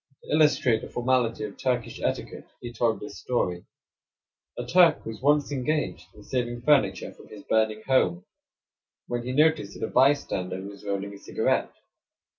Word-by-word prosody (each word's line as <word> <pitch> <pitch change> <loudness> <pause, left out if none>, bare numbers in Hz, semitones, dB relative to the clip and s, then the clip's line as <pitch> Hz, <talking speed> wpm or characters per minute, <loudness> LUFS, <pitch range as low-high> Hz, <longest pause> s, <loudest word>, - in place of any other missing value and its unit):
To - - -9
illustrate 150 -7 +3
the - - -8
formality 120 -3 0
of 105 -2 -6
Turkish 125 -3 -2
etiquette - - -3
he 120 -1 -8
told 115 -2 +1
this 100 -3 -9
story: 90 -5 -2 0.9
"A - - -4
Turk 180 -1 +4
was 115 +1 -7
once 145 +1 +3
engaged 150 +3 -2
in 105 - -14
saving 120 0 -3
furniture 105 -11 +2
from - - -16
his 105 - -12
burning 110 -1 +1
home, 90 -10 +2 0.8
when 120 0 -3
he 125 +2 -4
noticed 150 -7 +2
that - - -1
a - - -8
bystander 130 -9 +2
was 100 0 -10
rolling 100 0 -3
a 100 - -11
cigarette. - - 0
120 Hz, 160 wpm, -26 LUFS, 100-135 Hz, 0.9 s, Turk